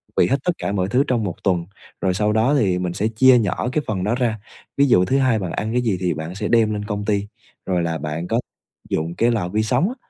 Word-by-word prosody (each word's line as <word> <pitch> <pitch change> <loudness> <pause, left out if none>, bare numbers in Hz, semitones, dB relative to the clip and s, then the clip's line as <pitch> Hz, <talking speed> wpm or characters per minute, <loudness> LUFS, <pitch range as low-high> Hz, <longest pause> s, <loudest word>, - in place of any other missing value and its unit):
bị - - +4
hết 135 - +2
tất 180 - +2
cả - - -3
mọi 95 -2 0
thứ 125 +6 +3
trong 120 -4 +1
một 90 -5 -3
tuần, 90 -4 +1 0.4
rồi 95 -1 +1
sau 105 +3 +1
đó 115 +7 +3
thì 95 -5 +1
mình 90 -1 -2
sẽ 100 +4 0
chia 125 +3 +5
nhỏ 110 +3 -1
cái 150 - -1
phần 95 -4 -2
đó 105 +5 +1
ra. 120 -4 -1 0.4
Ví 140 - +5
dụ 90 -7 +4
thứ 135 - +1
Hai 130 -5 +2
bạn 90 -3 -4
ăn 110 +1 -3
cái 125 - +2
gì 110 -6 0
thì 90 -2 0
bạn 80 +4 -6
sẽ - - -3
đem 110 -2 +3
lên 105 0 -4
công 105 -1 -3
ty, 105 -1 0 0.4
rồi 90 -2 0
là 80 -1 -1
bạn 75 +3 -4
có 115 +4 +1 0.5
dụng 80 +2 -2
cái 115 +5 +2
lò 105 -6 -1
vi 110 +3 0
sóng 130 - +1
á, 250 - -6
105 Hz, 275 wpm, -21 LUFS, 90-120 Hz, 0.5 s, chia